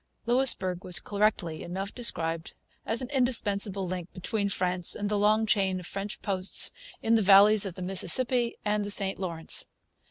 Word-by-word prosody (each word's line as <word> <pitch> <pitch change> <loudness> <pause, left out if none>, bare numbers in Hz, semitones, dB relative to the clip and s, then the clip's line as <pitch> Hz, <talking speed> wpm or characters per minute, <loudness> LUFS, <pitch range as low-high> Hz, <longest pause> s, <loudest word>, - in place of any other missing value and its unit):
Louisbourg 230 -8 +5
was 180 -4 +2
correctly 200 -5 -2
enough 190 +3 -6
described 165 -9 -3 0.3
as 230 +3 0
an 255 - -9
indispensable 205 -7 0
link 180 -1 -7
between 200 +2 -4
France 180 -2 -1
and 205 -1 -4
the 210 - -1
long 215 +2 +1
chain 195 -3 -1
of 180 - -11
French 200 +3 -7
posts 190 -1 +2 0.3
in 225 - 0
the 225 - +3
valleys 205 +1 +4
of 180 - -9
the 185 - -8
Mississippi 235 +6 +2
and 210 0 -1
the 205 - -6
St 195 -2 0
Lawrence. 170 -4 -4
200 Hz, 165 wpm, -26 LUFS, 185-215 Hz, 0.3 s, Louisbourg